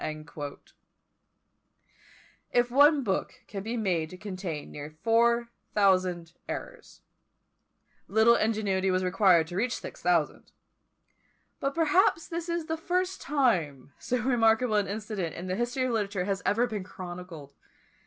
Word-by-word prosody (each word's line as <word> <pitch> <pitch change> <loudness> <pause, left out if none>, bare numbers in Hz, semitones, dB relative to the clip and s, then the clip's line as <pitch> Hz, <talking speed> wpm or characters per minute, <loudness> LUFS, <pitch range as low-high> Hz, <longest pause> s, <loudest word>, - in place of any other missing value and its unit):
" - - -6 2.5
If 245 0 +2
one 285 +2 +5
book 195 -5 -2
can 195 - -6
be 225 +4 -3
made 175 -7 0
to 185 - -10
contain 185 -6 -6
near 145 0 -7
four 235 +1 +3 0.3
thousand 185 -4 +2 0.2
errors, - - -8 1.0
little 220 +3 +5
ingenuity 205 -4 +1
was 185 0 +1
required 180 -3 +4
to 175 - -7
reach 235 +5 0
to - - -7
six - - -9
thousand; 170 -4 0 1.1
but 275 0 -2
perhaps 330 +1 +3
this 335 0 -5
is 340 -1 -1
the 320 0 -2
first 365 +3 -1
time 175 - 0
so 250 - -1
remarkable 230 -2 +3
an 205 -1 +2
incident 205 -4 -4
in 175 - -6
the 185 0 -2
history 240 +4 -1
of 255 - 0
literature 200 -4 -1
has 195 0 -1
ever 230 +4 +3
been 215 -5 -4
chronicled. 175 -6 -9
210 Hz, 140 wpm, -28 LUFS, 185-245 Hz, 2.5 s, one